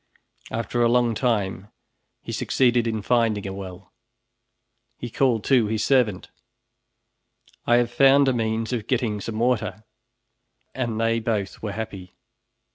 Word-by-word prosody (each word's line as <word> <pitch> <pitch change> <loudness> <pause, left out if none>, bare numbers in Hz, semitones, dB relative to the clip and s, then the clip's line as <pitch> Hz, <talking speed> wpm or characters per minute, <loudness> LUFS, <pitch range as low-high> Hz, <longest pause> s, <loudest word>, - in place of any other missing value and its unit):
After 115 +1 -2
a 120 - +4
long 120 -1 +2
time 105 -5 -1 0.6
he - - -6
succeeded 120 -2 +1
in 110 -2 -2
finding 115 -4 +1
a 95 - -4
well. 95 -2 -9 1.0
He 120 - -7
called 120 -5 +1
to 125 -5 +3
his 110 0 -1
servant, 120 -9 +1 1.4
"I 120 - +5
have 120 -1 +2
found 135 +2 +5
a 130 - +3
means 115 0 -1
of 115 -3 -3
getting 115 -5 -1
some 110 +2 -5
water," 115 -2 -1 0.9
and 120 -4 -3
they 115 0 +1
both 110 -4 -3
were 105 -2 -4
happy. 100 -4 -7
115 Hz, 135 wpm, -24 LUFS, 105-120 Hz, 1.4 s, I